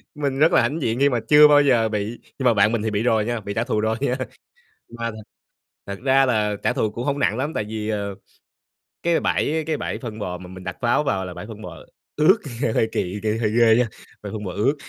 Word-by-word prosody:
Mình 140 Hz, -2 st, -2 dB
rất 160 Hz, +3 st, +5 dB
là -, -, +5 dB
hãnh 160 Hz, +2 st, -1 dB
diện 115 Hz, 0 st, -1 dB
khi 140 Hz, 0 st, +4 dB
mà 120 Hz, -3 st, 0 dB
chưa 150 Hz, 0 st, +8 dB
bao 145 Hz, 0 st, +6 dB
giờ 120 Hz, -5 st, +3 dB
bị, 105 Hz, +2 st, -3 dB, 0.2 s
nhưng 130 Hz, -, -2 dB
mà 120 Hz, -, +5 dB
bạn 105 Hz, +1 st, +3 dB
mình 115 Hz, -3 st, 0 dB
thì 110 Hz, -1 st, -2 dB
bị 105 Hz, +2 st, -1 dB
rồi 110 Hz, -3 st, +2 dB
nha, 120 Hz, -1 st, -2 dB
bị 100 Hz, 0 st, -5 dB
trả 115 Hz, -, 0 dB
thù 115 Hz, -4 st, -1 dB
rồi 110 Hz, +1 st, 0 dB
nha. 130 Hz, -2 st, +1 dB, 0.7 s
Mà 115 Hz, 0 st, -4 dB
thật 110 Hz, 0 st, -10 dB, 0.6 s
thật 100 Hz, 0 st, -6 dB
ra 135 Hz, 0 st, +4 dB
là 105 Hz, -4 st, +1 dB
trả -, -, +2 dB
thù 110 Hz, -, 0 dB
cũng 120 Hz, +4 st, -5 dB
hông 140 Hz, 0 st, -1 dB
nặng 115 Hz, -4 st, +1 dB
lắm 145 Hz, +4 st, -2 dB
tại 105 Hz, -, 0 dB
vì, 110 Hz, 0 st, -5 dB
ờ, 100 Hz, -2 st, -3 dB, 0.9 s
cái 170 Hz, -1 st, +2 dB
bãi 160 Hz, +1 st, 0 dB
cái 155 Hz, -2 st, 0 dB
bãi -, -, -4 dB
phân 115 Hz, -4 st, -7 dB
bò 90 Hz, -3 st, -4 dB
mà 90 Hz, 0 st, -11 dB
mình 95 Hz, 0 st, -10 dB
đặt -, -, -5 dB
pháo 120 Hz, +5 st, +2 dB
vào 95 Hz, -8 st, -1 dB
là 90 Hz, -, -7 dB
bãi 105 Hz, -, -8 dB
phân 110 Hz, -2 st, -10 dB
bò -, -, -9 dB, 0.4 s
ướt, 180 Hz, +8 st, +5 dB, 0.2 s
nghe 110 Hz, -, +1 dB
hơi 110 Hz, -, +1 dB
kỳ, 95 Hz, +3 st, -2 dB
kiểu, 110 Hz, 0 st, 0 dB
hơi 105 Hz, -2 st, +1 dB
ghê 115 Hz, -1 st, +6 dB
nha, 125 Hz, -1 st, +3 dB, 0.3 s
ờ, 105 Hz, -, -7 dB
phân 105 Hz, -1 st, -5 dB
bò 90 Hz, -, -4 dB
ướt. 120 Hz, +10 st, +1 dB
115 Hz, 260 wpm, -22 LUFS, 105-135 Hz, 0.9 s, chưa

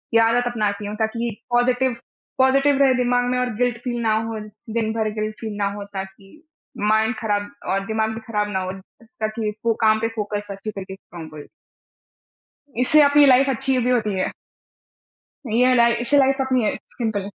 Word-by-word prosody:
ये -, -, +7 dB
आदत 240 Hz, +2 st, +2 dB
अपनाती 210 Hz, -4 st, -1 dB
हूँ 210 Hz, -, -5 dB
ताकि 230 Hz, +1 st, -1 dB, 0.2 s
पॉजिटिव 245 Hz, 0 st, +2 dB, 0.4 s
पॉजिटिव 275 Hz, +2 st, +4 dB
रहे 265 Hz, -1 st, +5 dB
दिमाग 245 Hz, 0 st, +1 dB
में 250 Hz, -, 0 dB
और 250 Hz, 0 st, 0 dB
गिल्ट 245 Hz, -1 st, +1 dB
फ़ील 240 Hz, -2 st, -2 dB
ना 220 Hz, -1 st, +2 dB
हो, 225 Hz, -1 st, -4 dB
दिन 215 Hz, +1 st, -4 dB
भर 220 Hz, -1 st, 0 dB
गिल्ट 215 Hz, 0 st, -3 dB
फ़ील 215 Hz, -2 st, -5 dB
ना 200 Hz, -, 0 dB
हो 205 Hz, -, -6 dB
ताकि 195 Hz, 0 st, -8 dB, 0.6 s
माइंड 220 Hz, +2 st, +2 dB
ख़राब 205 Hz, -2 st, -1 dB, 0.2 s
और 195 Hz, +1 st, 0 dB
दिमाग 220 Hz, 0 st, 0 dB
भी -, -, -5 dB
ख़राब 210 Hz, -2 st, -1 dB
ना 190 Hz, -, -1 dB
हो 185 Hz, 0 st, -3 dB, 0.3 s
ताकि 220 Hz, -2 st, -4 dB, 0.2 s
वो 230 Hz, -, +3 dB
काम 220 Hz, 0 st, +4 dB
पे 225 Hz, -, +1 dB
फोकस 205 Hz, -1 st, -3 dB
अच्छी 200 Hz, +2 st, -6 dB
तरह 195 Hz, -2 st, -6 dB
से -, -, -6 dB
काम 170 Hz, -4 st, -11 dB
करें। 150 Hz, -1 st, -10 dB, 1.3 s
इससे 295 Hz, +5 st, +5 dB
अपनी 285 Hz, 0 st, +6 dB
लाइफ़ 270 Hz, 0 st, +5 dB
अच्छी 265 Hz, +1 st, 0 dB
भी 245 Hz, -, 0 dB
होती 220 Hz, -5 st, +1 dB
है। -, -, -1 dB, 1.2 s
यह 250 Hz, +2 st, +4 dB
लाई 235 Hz, -1 st, +5 dB
इससे 245 Hz, +4 st, +2 dB
लाइफ़ 270 Hz, 0 st, +3 dB
अपनी 255 Hz, -4 st, +1 dB, 0.3 s
सिंपल 220 Hz, -4 st, -1 dB
225 Hz, 185 wpm, -22 LUFS, 210-250 Hz, 1.3 s, ये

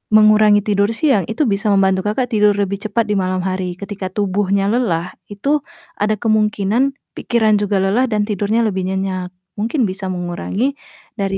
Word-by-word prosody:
mengurangi 215 Hz, -1 st, +6 dB
tidur 200 Hz, -1 st, +1 dB
siang, 270 Hz, -, +3 dB
itu 235 Hz, +7 st, 0 dB
bisa 200 Hz, +2 st, -2 dB
membantu 190 Hz, -1 st, +3 dB
Kakak 245 Hz, +4 st, 0 dB
tidur 210 Hz, -1 st, +4 dB
lebih 200 Hz, 0 st, -1 dB
cepat 215 Hz, +2 st, 0 dB
di 210 Hz, -, +1 dB
malam 185 Hz, -1 st, -1 dB
hari. 185 Hz, -1 st, -2 dB
Ketika 200 Hz, -1 st, -5 dB
tubuhnya 200 Hz, 0 st, 0 dB
lelah 185 Hz, -8 st, -1 dB, 0.2 s
itu 275 Hz, +9 st, 0 dB, 0.4 s
ada 215 Hz, +1 st, +2 dB
kemungkinan 215 Hz, +4 st, +1 dB, 0.2 s
pikiran 220 Hz, -3 st, +2 dB
juga 205 Hz, -1 st, 0 dB
lelah 210 Hz, +7 st, +2 dB
dan 210 Hz, -1 st, +1 dB
tidurnya 210 Hz, +2 st, 0 dB
lebih 190 Hz, -2 st, -2 dB
nyenyak, 190 Hz, -1 st, -2 dB, 0.3 s
mungkin 235 Hz, +6 st, 0 dB
bisa 190 Hz, +1 st, -6 dB
mengurangi 180 Hz, +9 st, -2 dB, 0.4 s
dari 195 Hz, -1 st, -1 dB
205 Hz, 160 wpm, -18 LUFS, 190-215 Hz, 0.4 s, mengurangi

